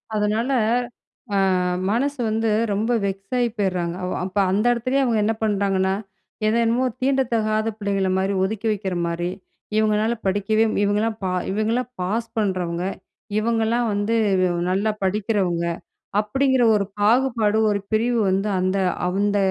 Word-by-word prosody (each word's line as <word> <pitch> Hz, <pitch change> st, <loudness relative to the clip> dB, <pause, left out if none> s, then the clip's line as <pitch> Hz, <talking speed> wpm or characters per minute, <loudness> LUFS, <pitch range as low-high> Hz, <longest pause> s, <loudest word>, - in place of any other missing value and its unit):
அதனால 215 Hz, +5 st, 0 dB, 0.8 s
அ -, -, +3 dB, 0.5 s
மனசு 275 Hz, +5 st, 0 dB
வந்து 225 Hz, +1 st, 0 dB, 0.2 s
ரொம்ப 220 Hz, +4 st, 0 dB
வெக்ஸ் 195 Hz, +3 st, -5 dB
ஆகி 240 Hz, -1 st, +2 dB
போயிட்றாங்க. 180 Hz, -4 st, -1 dB
அவ 180 Hz, -, -2 dB, 0.2 s
அப்போ 195 Hz, +2 st, -2 dB
அந்த 210 Hz, +4 st, +1 dB
இடத்துலேயே 255 Hz, +4 st, 0 dB
அவங்க 230 Hz, -3 st, +1 dB
என்ன 225 Hz, -, +2 dB
பண்ணுறாங்கன்னா 195 Hz, -2 st, +1 dB, 0.5 s
எதென்னமோ 235 Hz, +3 st, +2 dB, 0.2 s
தீண்ட 270 Hz, 0 st, +2 dB
தகாத 215 Hz, 0 st, +1 dB
பிள்ளைங்கள 200 Hz, -2 st, 0 dB
மாதிரி 195 Hz, +1 st, 0 dB
ஒதுக்கி 220 Hz, +3 st, -2 dB
வைக்கிற 195 Hz, -3 st, -2 dB
மாதிரி 175 Hz, +1 st, -2 dB, 0.5 s
இவங்களால 215 Hz, +1 st, +2 dB
படிக்கவே, 205 Hz, +3 st, +2 dB, 0.2 s
இவங்கலாம் 215 Hz, +2 st, 0 dB
பா 185 Hz, -, 0 dB, 0.2 s
இவங்களலாம் 225 Hz, +4 st, 0 dB
பாஸ் 225 Hz, +5 st, -1 dB
பண்ணுறவங்க. 180 Hz, -4 st, -1 dB, 0.5 s
இவங்கலாம் 230 Hz, +1 st, +1 dB
வந்து 205 Hz, +3 st, 0 dB, 0.5 s
நல்லா 200 Hz, +4 st, +1 dB
படிக்கிறவங்க 190 Hz, -4 st, 0 dB, 0.5 s
அப்படிங்கிற 260 Hz, +3 st, +2 dB
ஒரு 200 Hz, -1 st, +1 dB
பாகுபாடு 225 Hz, -1 st, +2 dB
ஒரு 200 Hz, -1 st, +1 dB
பிரிவு 230 Hz, +2 st, +2 dB
வந்து 195 Hz, +2 st, 0 dB
அந்த 185 Hz, +1 st, 0 dB, 0.3 s
அந்த 205 Hz, +2 st, +1 dB
210 Hz, 130 wpm, -22 LUFS, 195-230 Hz, 0.8 s, அ